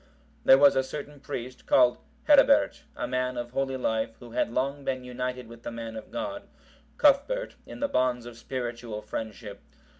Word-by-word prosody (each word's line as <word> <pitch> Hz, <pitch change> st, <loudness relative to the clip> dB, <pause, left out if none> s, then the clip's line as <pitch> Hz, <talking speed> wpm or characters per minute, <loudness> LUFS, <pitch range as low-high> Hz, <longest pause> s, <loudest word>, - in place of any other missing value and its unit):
There 135 Hz, -, +9 dB
was 140 Hz, 0 st, +6 dB
a 135 Hz, -, +4 dB
certain 145 Hz, +2 st, -7 dB
priest, 130 Hz, -1 st, -7 dB
called 125 Hz, -2 st, +5 dB, 0.3 s
Herebert, -, -, +5 dB
a -, -, -3 dB
man 130 Hz, 0 st, -1 dB
of 120 Hz, 0 st, -4 dB
holy 135 Hz, 0 st, -1 dB
life, 110 Hz, -2 st, -1 dB
who 120 Hz, -1 st, -12 dB
had 115 Hz, -, 0 dB
long 140 Hz, +3 st, -1 dB
been 130 Hz, -2 st, -2 dB
united 125 Hz, -1 st, -4 dB
with 115 Hz, 0 st, -12 dB
the -, -, -5 dB
man 115 Hz, -1 st, -6 dB
of 110 Hz, -, -8 dB
God, 300 Hz, 0 st, -5 dB, 0.5 s
Cuthbert, 300 Hz, -, +3 dB
in -, -, -9 dB
the 285 Hz, -, +2 dB
bonds 125 Hz, -, +1 dB
of 120 Hz, -1 st, -9 dB
spiritual 120 Hz, -3 st, -5 dB
friendship. 105 Hz, -1 st, -6 dB
125 Hz, 175 wpm, -28 LUFS, 115-135 Hz, 0.5 s, There